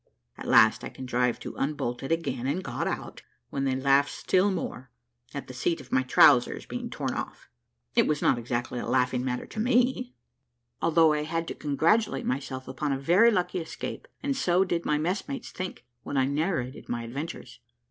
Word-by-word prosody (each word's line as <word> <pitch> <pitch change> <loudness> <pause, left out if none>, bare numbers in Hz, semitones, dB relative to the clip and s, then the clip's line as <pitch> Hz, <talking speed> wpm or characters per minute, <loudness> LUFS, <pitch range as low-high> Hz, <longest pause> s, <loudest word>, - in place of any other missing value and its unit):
At - - -8
last 110 - +6
I - - -4
contrived 125 -2 -1
to - - -7
unbolt 130 -4 -2
it 135 - -5
again, 135 -7 -1
and 165 +7 -1
got - - -3
out, - - -5 0.3
when 135 0 -1
they 130 -1 +1
laughed 140 +1 +3
still 190 +2 +2
more, 145 -8 -4 0.4
at 140 - -5
the 130 - -10
seat 165 +7 -1
of 130 -3 -13
my 130 - +3
trowsers 125 -1 +5
being 245 -1 -5
torn - - -3
off. - - -6 0.4
It 235 - +4
was 150 -1 +1
not 120 - +2
exactly 120 +1 -3
a - - -4
laughing 125 0 +1
matter 125 -1 -2
to 220 - -8
me, 250 +2 +1 0.7
although 165 -1 +4
I 150 - 0
had 165 +2 -2
to - - -3
congratulate 155 +3 +1
myself 130 0 -3
upon 140 +3 -2
a 135 - +1
very 175 +12 +5
lucky 180 -4 0
escape; 165 - -6 0.2
and 280 -1 0
so 185 -7 +3
did 170 -3 -2
my 150 - +2
messmates 200 - -3
think, 185 0 -6 0.2
when 145 - -4
I 130 - +4
narrated 140 -2 -2
my 120 -1 -2
adventures. 140 +8 -7
145 Hz, 190 wpm, -27 LUFS, 130-180 Hz, 0.7 s, last